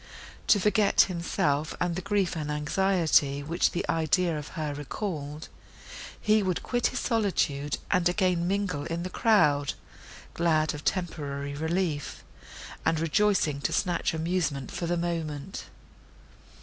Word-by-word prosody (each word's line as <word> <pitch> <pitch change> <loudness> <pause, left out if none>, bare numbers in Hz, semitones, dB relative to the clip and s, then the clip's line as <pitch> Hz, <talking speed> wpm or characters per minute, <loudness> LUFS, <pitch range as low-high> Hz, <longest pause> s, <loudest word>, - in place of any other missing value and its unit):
To 205 - +6
forget 210 +1 +4
himself 155 -4 0
and 175 -1 0
the 185 - -3
grief 200 -2 0
and 150 -2 -3
anxiety, 150 -2 +2
which 170 +5 +1
the 175 - -3
idea 165 +1 +1
of 150 -1 -5
her 150 -2 -2
recalled, 150 0 -5 0.7
he 215 0 +3
would 185 -3 -1
quit 245 -1 +1
his 255 - -3
solitude, 175 - 0
and 180 -2 +3
again 180 -2 +1
mingle 190 -6 -1
in 170 0 -3
the 185 - -5
crowd—glad 155 - 0
of 150 - -6
a - - -24
temporary 145 -6 -2
relief, 160 0 -2 0.6
and 160 -1 +1
rejoicing 165 -3 +2
to - - -1
snatch 175 -3 0
amusement 160 -5 -1
for 170 - -3
the 175 +1 0
moment. 165 -1 -3
170 Hz, 135 wpm, -28 LUFS, 150-185 Hz, 0.7 s, To